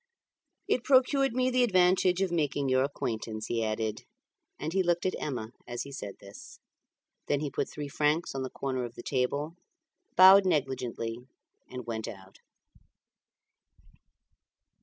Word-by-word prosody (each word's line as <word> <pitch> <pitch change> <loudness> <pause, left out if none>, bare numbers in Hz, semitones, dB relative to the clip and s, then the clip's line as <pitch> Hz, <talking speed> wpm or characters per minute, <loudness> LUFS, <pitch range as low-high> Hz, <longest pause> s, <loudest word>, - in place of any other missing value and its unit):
"It 245 - +1
procured 270 0 +3
me 255 +1 +1
the 255 0 +3
advantage 185 -4 +3
of 185 - -1
making 145 -4 0
your 130 0 +3
acquaintance," 110 -5 -4
he 115 -1 -1
added, 110 0 -2 0.6
and 155 +3 -4
he 190 - +3
looked 175 -1 0
at 185 - +1
Emma 120 -6 -4 0.2
as 120 0 -4
he 140 - -10
said 100 -7 -7
this. 100 0 -12 0.7
Then 145 - +1
he 145 -2 -3
put - - -2
three 145 -1 -6
francs 150 +4 0
on 135 - -3
the 130 - -3
corner 130 -2 -3
of 120 0 -7
the - - -9
table, 140 +5 -1 0.6
bowed 190 +2 +9
negligently, 125 -7 -1 0.5
and 125 -2 -7
went 110 -1 -4
out. 95 -2 -11
140 Hz, 145 wpm, -29 LUFS, 120-180 Hz, 0.7 s, bowed